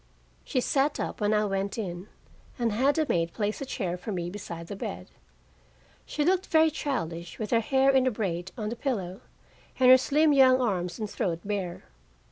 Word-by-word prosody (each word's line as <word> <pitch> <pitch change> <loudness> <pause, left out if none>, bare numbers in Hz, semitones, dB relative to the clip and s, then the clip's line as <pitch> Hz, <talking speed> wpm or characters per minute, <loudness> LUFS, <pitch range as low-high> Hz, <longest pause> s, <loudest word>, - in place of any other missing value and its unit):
She 255 - -1
sat 280 +3 +1
up - - -4
when 205 0 +2
I 210 0 +2
went 195 +1 -2
in, 185 -3 -5 0.5
and 235 -3 0
had 265 +8 +2
a 315 - +2
maid 170 -5 0
place 210 +2 -2
a 275 - -4
chair 180 -9 -3
for 210 - -5
me 175 -2 -3
beside 170 -4 -7
the 200 - -7
bed. 90 - -6 1.0
She 295 - -1
looked 370 +2 +2
very 320 0 +4
childish, 170 - -4
with 215 -2 -5
her 230 - +4
hair 265 +4 +3
in 260 -1 +3
a - - +2
braid 185 -5 -3
on 210 -2 -3
the 235 - -4
pillow, 200 -8 -3 0.6
and 255 -1 +7
her 260 - +9
slim 300 +3 +3
young 260 -2 +6
arms 180 -8 -1
and 215 - -3
throat 170 -4 -2
bare. 195 -4 -3
215 Hz, 195 wpm, -27 LUFS, 180-265 Hz, 1.0 s, her